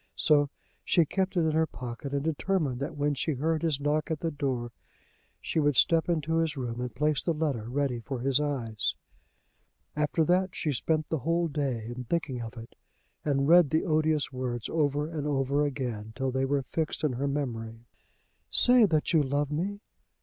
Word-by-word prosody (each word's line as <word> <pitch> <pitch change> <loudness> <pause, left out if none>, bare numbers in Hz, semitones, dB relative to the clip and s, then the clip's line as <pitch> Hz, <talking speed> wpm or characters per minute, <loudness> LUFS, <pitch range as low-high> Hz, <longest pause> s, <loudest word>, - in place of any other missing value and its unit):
So 145 -2 +3 0.3
she 170 - +3
kept 190 +4 -1
it - - +4
in 160 -1 +2
her 160 +1 +2
pocket, 125 0 -7
and 140 0 -1
determined 155 -4 0
that 140 - -4
when 145 0 +1
she 145 +3 -1
heard 155 +4 0
his 155 -4 0
knock 150 +2 0
at 160 -2 -2
the 165 - -1
door 130 -5 -2 0.7
she - - -2
would 145 -2 +2
step 165 +5 +4
into 160 -1 0
his 165 -3 0
room, 120 -2 -4
and 125 -3 -5
place 150 +1 +1
the 170 - -1
letter 140 -8 -2
ready 135 -2 -1
for 125 +1 -5
his 135 +1 +2
eyes. 125 -8 -1 1.0
After 150 +2 +1
that 185 +2 +1
she 155 - -1
spent 155 +4 0
the 160 - -1
whole 170 +5 +1
day 135 -7 -2
in 125 0 -6
thinking 135 -4 -2
of 115 +1 -7
it, 115 0 -10 0.5
and 140 -2 +1
read 170 -2 +7
the 160 +5 +1
odious 155 -4 +1
words 125 -2 -3
over 150 -2 0
and 155 -3 -4
over 140 0 +1
again 120 -6 -4
till 135 0 -1
they 130 +1 0
were 140 0 0
fixed 155 +6 -3
in 150 -4 +1
her 135 +4 -1
memory. 115 -5 -4 0.6
"Say 245 -2 +6
that 155 -2 +1
you 160 - +5
love 145 +1 -1
me!" 195 +7 -2
145 Hz, 190 wpm, -28 LUFS, 130-160 Hz, 1.0 s, read